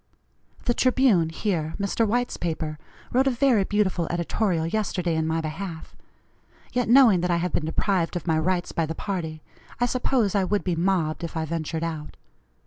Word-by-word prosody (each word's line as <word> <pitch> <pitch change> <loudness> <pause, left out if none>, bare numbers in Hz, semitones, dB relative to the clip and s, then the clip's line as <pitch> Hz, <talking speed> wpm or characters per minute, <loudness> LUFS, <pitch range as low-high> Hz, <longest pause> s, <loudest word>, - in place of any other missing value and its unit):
The 240 - +2
Tribune 245 -10 +3
here, 160 -2 -2
Mr. 200 +3 +1
White's 245 +3 0
paper, 155 -2 -3 0.3
wrote 260 +2 +3
a - - +6
very 250 -4 +3
beautiful 190 -4 0
editorial 175 0 0
yesterday 180 -2 -1
in 160 0 0
my 160 0 0
behalf; 160 +1 -6 0.8
yet 245 -2 0
knowing 240 -7 +7
that 180 - 0
I 170 - +2
have 175 +1 -2
been 155 - 0
deprived 175 +1 0
of 175 - -3
my 160 -2 +2
rights 175 +2 0
by 165 -1 -1
the 160 - -4
party, 160 -6 -4 0.4
I 245 - +3
suppose 245 -4 +1
I 200 -2 +2
would 205 +2 0
be 180 -2 0
mobbed 170 -2 0
if 165 0 -4
I 160 - -1
ventured 160 0 -3
out. 160 -2 -5
175 Hz, 180 wpm, -25 LUFS, 160-210 Hz, 0.8 s, knowing